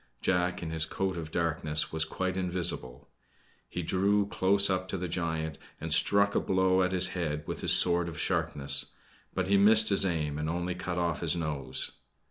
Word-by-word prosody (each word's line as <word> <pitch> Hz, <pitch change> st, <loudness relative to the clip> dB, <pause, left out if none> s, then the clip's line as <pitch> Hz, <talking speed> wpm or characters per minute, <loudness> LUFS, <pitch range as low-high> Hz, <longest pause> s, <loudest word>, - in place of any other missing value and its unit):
Jack, 90 Hz, +2 st, -1 dB
in 80 Hz, -, -5 dB
his 80 Hz, -1 st, -1 dB
coat 95 Hz, +2 st, -3 dB
of 80 Hz, -2 st, -6 dB
darkness, 80 Hz, -2 st, -1 dB
was 80 Hz, 0 st, -1 dB
quite 95 Hz, +3 st, -3 dB
invisible. 90 Hz, -9 st, -2 dB, 0.6 s
He 90 Hz, -, -5 dB
drew 100 Hz, +4 st, +1 dB
close 100 Hz, 0 st, +3 dB
up 95 Hz, -1 st, -1 dB
to 95 Hz, -, -4 dB
the 90 Hz, 0 st, -4 dB
giant 80 Hz, -3 st, -3 dB, 0.2 s
and 80 Hz, 0 st, -2 dB
struck 100 Hz, +3 st, +3 dB
a -, -, +2 dB
blow 95 Hz, 0 st, +1 dB
at 90 Hz, 0 st, +1 dB
his 90 Hz, -1 st, +4 dB
head 75 Hz, -5 st, -3 dB
with -, -, -6 dB
his -, -, +5 dB
sword 85 Hz, -1 st, +3 dB
of 80 Hz, -, -8 dB
sharpness; 70 Hz, -1 st, +1 dB, 0.4 s
but 95 Hz, -1 st, -1 dB
he 100 Hz, +1 st, +3 dB
missed 110 Hz, +2 st, +6 dB
his 100 Hz, -1 st, +3 dB
aim 75 Hz, -5 st, -2 dB
and 75 Hz, +1 st, -3 dB
only 90 Hz, +2 st, -2 dB
cut 90 Hz, 0 st, -5 dB
off 85 Hz, -4 st, -1 dB
his 85 Hz, 0 st, +1 dB
nose. 75 Hz, -5 st, -3 dB
90 Hz, 190 wpm, -29 LUFS, 80-95 Hz, 0.6 s, missed